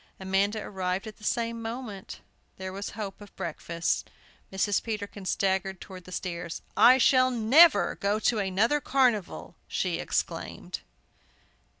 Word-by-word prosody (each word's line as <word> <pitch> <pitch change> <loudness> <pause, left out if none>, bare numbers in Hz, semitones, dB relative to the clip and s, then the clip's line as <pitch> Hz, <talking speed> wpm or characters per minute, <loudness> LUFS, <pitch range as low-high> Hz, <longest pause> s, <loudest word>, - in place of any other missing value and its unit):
Amanda 195 +3 +1
arrived 185 0 -3
at 215 -1 -9
the 215 - -18
same 230 +1 -1
moment. 225 -4 -6 0.4
There 190 0 -6
was 200 +1 -5
hope 205 -2 -6
of 205 - -13
breakfast. 170 +1 -2 0.4
Mrs. 195 +1 +1
Peterkin 205 -3 -5
staggered 190 0 0
towards 185 -2 -10
the 185 - -11
stairs. 170 -2 -5
"I 255 +2 +7
shall 255 0 +5
never 255 +8 +5
go 200 +1 +1
to 225 0 +2
another 210 +9 +1
carnival!" 250 -8 +1
she - - -1
exclaimed. - - -3
205 Hz, 130 wpm, -28 LUFS, 190-230 Hz, 0.4 s, I